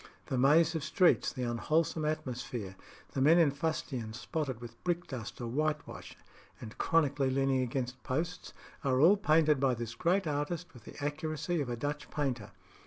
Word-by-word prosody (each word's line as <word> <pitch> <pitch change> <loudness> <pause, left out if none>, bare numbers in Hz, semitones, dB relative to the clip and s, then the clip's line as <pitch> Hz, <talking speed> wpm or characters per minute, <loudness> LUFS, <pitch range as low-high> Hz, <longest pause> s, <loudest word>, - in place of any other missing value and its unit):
The - - -2
maze 155 +5 +5
of 160 -3 -2
streets, 180 +3 +3
the 130 - -4
unwholesome 155 +6 0
atmosphere, 125 -9 -3 0.4
the 135 - -2
men 155 +5 +6
in 165 -5 +5
fustian 135 -6 -3
spotted 130 -1 -3
with 120 -1 -11
brickdust 170 -10 -3
or 120 - -4
whitewash, 150 +6 -3 0.4
and 110 -1 -9
chronically 145 -4 +2
leaning 135 0 +2
against 125 0 -3
posts, 165 +9 -3 0.3
are 130 -2 +2
all 170 +8 +7
painted 155 -6 +3
by 130 -2 +2
this 115 -1 -5
great 180 +6 +1
artist 155 +4 -3
with 120 -5 -15
the - - -11
accuracy 155 +2 -2
of 135 - -3
a 120 - -1
Dutch 145 +3 -4
painter. 130 -8 -2
140 Hz, 165 wpm, -32 LUFS, 125-160 Hz, 0.4 s, all